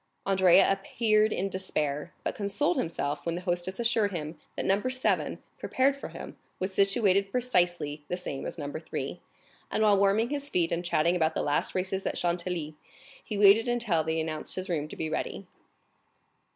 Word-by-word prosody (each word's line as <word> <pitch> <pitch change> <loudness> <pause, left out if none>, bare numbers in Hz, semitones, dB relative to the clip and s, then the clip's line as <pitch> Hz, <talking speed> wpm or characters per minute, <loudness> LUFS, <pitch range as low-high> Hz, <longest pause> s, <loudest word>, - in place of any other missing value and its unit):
Andrea 190 -1 +5
appeared 215 +2 +2
in 195 - -1
despair, 150 -6 -2
but - - -1
consoled 200 -3 0
himself 150 -3 -2
when 170 0 -2
the 175 - -4
hostess 180 +2 -2
assured 230 -3 +2
him 155 -3 -5 0.2
that - - -3
No. 195 +2 +2
7, 255 +1 0 0.2
prepared 270 +2 +2
for 280 - -7
him, - - -9 0.2
was 185 +1 -2
situated 195 -1 +3
precisely 175 -11 0
the 180 - -2
same 145 -7 -5
as - - -6
No. 145 -2 -4
3, 160 +2 -5 0.5
and 220 - +1
while 205 -2 +5
warming 205 +5 +3
his 285 -1 -2
feet 170 -2 +1
and 170 +1 -1
chatting 170 0 +2
about 160 -2 +1
the - - 0
last 145 0 0
races 190 +1 -1
at - - -2
Chantilly, 170 -3 -2 0.5
he 210 - -4
waited 205 +3 +6
until 230 -9 +1
they 160 +1 -1
announced 160 -1 -3
his 185 +1 -4
room 155 -4 -1
to - - -9
be 160 - -3
ready. - - -3
185 Hz, 180 wpm, -28 LUFS, 165-205 Hz, 0.5 s, waited